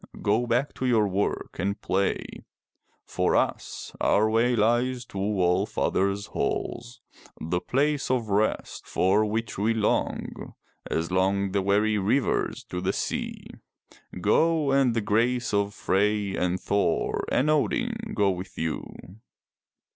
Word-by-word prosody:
Go 110 +4 +2
back 125 +4 0
to 130 - -1
your 110 -4 +3
work 100 +1 -2
and 100 +3 -1
play. 95 +1 0 0.8
For - - 0
us, - - -1
our 110 +1 +3
way 120 +2 +3
lies 120 +3 +1
to 100 - -7
All 95 -1 +1
father's 100 +1 0
halls, 120 +3 -3 0.2
— - - -23
the 90 +2 -2
place 145 +2 0
of 120 -4 0
rest, 105 +2 -1
for 100 +4 +2
which 110 0 -2
we 110 +3 +1
long 105 -2 -2 0.3
as 80 +2 -1
long 95 +1 +1
the 100 0 +1
weary 105 +2 +2
rivers 110 +7 0
for 90 - -4
the 95 +1 0
sea. - - -3 0.7
Go, 155 - +2
and 135 -3 +3
the 115 - +1
grace 120 +3 +1
of 100 0 +1
Frey 100 +1 +1
and 90 +1 0
Thor 100 +2 0
and 135 - +2
Odin 240 - +1 0.2
go 100 -2 +3
with 90 +1 -7
you. 80 -1 -3
105 Hz, 140 wpm, -26 LUFS, 100-120 Hz, 0.8 s, your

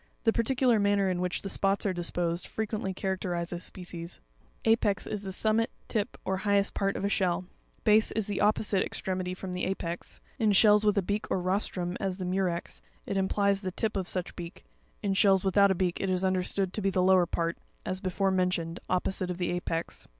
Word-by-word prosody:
The 225 - +3
particular 245 -1 +3
manner 200 -1 +2
in 180 -1 -1
which 180 0 -1
the 195 - -4
spots 195 +1 +1
are 195 - +1
disposed, 175 0 -2
frequently 215 -3 -3
characterizes 180 -2 -3
species. 175 -2 -6 0.5
Apex, 215 -3 +2
is 210 - -4
the 195 -2 -5
summit, 220 +3 +1 0.2
tip, 210 -2 -2
or 190 - 0
highest 200 0 +2
part 195 0 0
of - - -2
a - - +3
shell 185 -3 +1
( 180 - -24
fig. 215 - +5
116). - - +8
Base, 220 +1 +5
is 215 - -1
the 205 -1 -2
opposite 205 -2 +3
extremity 185 -1 -3
from 185 0 -6
the 180 - -3
apex 175 -2 -4
(fig. - - -27 0.2
116). 220 - +2
In - - +5
shells 210 +1 +6
with 210 - +3
a 200 - +3
beak 205 +2 -1
or - - +1
rostrum 180 -1 -1
(as 190 -2 -2
the 185 - -4
Murex, 180 -2 -2
fig. - - -36 0.3
64), - - 0
it - - -1
implies 200 +1 +1
the 185 -2 -3
tip 215 +4 -2
of 190 -2 -2
such 180 -1 -3
beak; 175 +1 -8 0.4
in 200 -1 +1
shells 195 -1 +4
without 200 +1 +5
a 190 - +2
beak 180 -1 0
it 195 - -1
is 185 0 +1
understood 185 0 0
to 215 - -2
be 195 - +2
the 185 -1 +1
lower 185 -1 +5
part, 170 +1 -2 0.3
as 185 0 -2
before 190 +1 0
mentioned, 180 -2 0
opposite 185 0 0
the 175 -1 -1
apex. 170 -2 -3
190 Hz, 220 wpm, -29 LUFS, 180-200 Hz, 0.5 s, 116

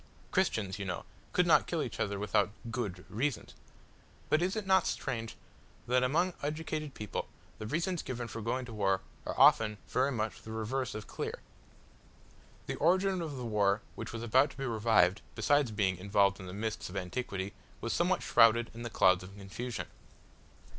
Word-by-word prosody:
Christians, 100 -2 0
you 100 - -3
know, 90 -2 -4 0.3
could - - +3
not - - +5
kill - - 0
each - - -6
other 100 0 -1
without 105 0 +2 0.2
good 100 -6 -3
reasons; 120 +6 -2 0.8
but 155 - +3
is 185 +3 0
it 215 -2 -2
not 190 -1 +4
strange 115 -4 -3 0.5
that 125 +1 +3
among 165 +8 +2
educated 155 0 -3
people, 105 -2 -4 0.3
the 110 - -5
reasons 170 - -1
given 120 -2 -4
for 115 +1 -6
going 125 +4 -1
to 120 - -9
war 95 -3 +1 0.3
are - - -3
often 105 -1 +6
very 130 +3 +1
much 110 -3 -2
the 110 - -9
reverse 115 +4 -2
of 110 - -5
clear? - - -4 1.3
The - - -4
origin 185 +3 +3
of 150 -4 -4
the 125 - -4
war 105 -2 +2
which 115 - -6
was 115 0 -5
about 130 +5 +4
to 135 - -14
be 135 - -3
revived, 110 -5 +3
besides 140 +4 +3
being 100 -4 +1
involved 100 +1 +2
in 95 - -8
the - - -6
mists 110 +2 -3
of 95 - -6
antiquity, 95 0 -3 0.3
was 115 - -2
somewhat 180 +2 +1
shrouded 115 0 +5
in 115 - -8
the 120 - -4
clouds 95 -4 +4
of 95 +2 -11
confusion. 110 +5 -5
115 Hz, 180 wpm, -32 LUFS, 100-135 Hz, 1.3 s, often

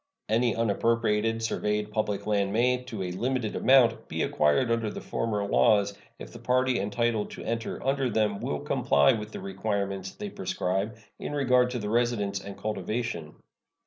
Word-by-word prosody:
Any 115 +2 +2
unappropriated 115 0 +1
surveyed 105 -1 -1
public 105 -2 -1
land 100 -2 +1
may, 125 +3 +2
to 110 -6 -5
a 90 - -3
limited 120 +3 -1
amount, 125 -4 +4
be - - -2
acquired 75 - +2
under 115 -2 0
the - - -6
former 105 -3 -2
laws 100 0 +3 0.2
if - - -10
the - - -9
party 130 0 +2
entitled 110 +1 0
to - - -8
enter 115 0 -3
under 135 -1 +1
them 105 -2 +1
will - - -3
comply 70 0 +3
with 105 -1 -5
the - - -6
requirements 100 - -2
they 205 -1 -6
prescribe 110 - -2 0.2
in - - -5
regard 125 -3 +3
to 125 - -3
the 105 -2 -3
residence 115 -4 +1
and 100 0 -8
cultivation. 105 -5 -3
110 Hz, 165 wpm, -28 LUFS, 100-125 Hz, 0.2 s, amount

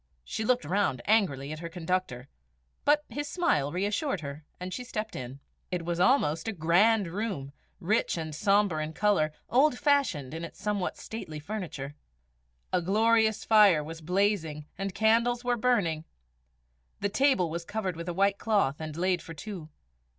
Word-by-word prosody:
She 220 - -4
looked 250 +2 +1
round 180 -10 0
angrily 155 -11 +2
at 155 - -5
her 170 0 -6
conductor. 170 -7 -2 0.6
But 300 +1 +4
his 290 0 -4
smile 150 - +1
reassured 200 - -1
her, 140 +1 -7 0.2
and 180 0 -5
she 250 - -4
stepped 220 -3 -5
in. 130 +2 -7 0.3
It 175 -2 -3
was 175 0 -2
almost 170 - +3
a 225 - -1
grand 195 +6 +3
room, 175 -7 -4 0.3
rich 200 +1 +1
and 160 -2 -4
sombre 195 -1 +2
in 155 +1 -5
colour, 190 -6 +2 0.2
old 265 +1 +3
fashioned 275 - +1
in 165 +1 -5
its 170 - -8
somewhat 205 -3 -2
stately 160 -9 -7
furniture. 155 -6 -5 0.8
A 180 - +3
glorious 220 +3 +2
fire 205 -8 +6
was 160 +2 -8
blazing 175 -4 0
and 195 -1 -4
candles 230 +3 +3
were 245 0 +1
burning. 205 -10 +1 1.0
The 200 - +1
table 205 - +2
was 170 +1 -3
covered 190 -1 -3
with 170 +1 -5
a - - -2
white 200 +1 +2
cloth, 200 -11 +1
and 155 0 -6
laid 180 0 +1
for 165 - -9
two. 175 -2 -7
185 Hz, 165 wpm, -29 LUFS, 160-220 Hz, 1.0 s, fire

